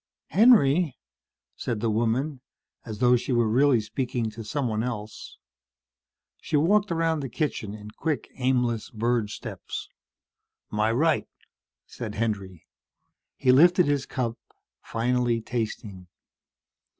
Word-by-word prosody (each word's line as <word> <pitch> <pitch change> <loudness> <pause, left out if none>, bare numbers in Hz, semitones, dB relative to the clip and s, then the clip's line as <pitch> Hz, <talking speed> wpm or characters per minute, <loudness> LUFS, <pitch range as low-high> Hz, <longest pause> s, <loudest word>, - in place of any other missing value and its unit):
"Henry?" 180 - +5 0.6
said 115 -3 -3
the 115 0 0
woman, 120 +6 0 0.5
as 110 -2 -5
though 125 +1 +5
she 125 +2 -2
were 120 -2 +3
really 130 +2 +4
speaking 115 +1 -3
to 115 +1 -8
someone 110 -2 -1
else. 110 -3 -6 1.0
She 150 - -1
walked 200 +6 +3
around 165 -1 +1
the 135 -2 -4
kitchen 115 -5 -3
in 105 0 -10
quick 155 +5 -2
aimless 125 -3 0
bird 115 -2 0
steps. - - -7 0.8
"My 105 +1 +1
right," 155 +6 +2 0.6
said 110 -3 -7
Henry. 100 -6 -3 0.7
He 130 - +4
lifted 175 +6 +6
his 145 -2 0
cup, 120 -3 -3 0.4
finally, 120 0 0
tasting. 110 -5 -5
120 Hz, 115 wpm, -26 LUFS, 110-140 Hz, 1.0 s, lifted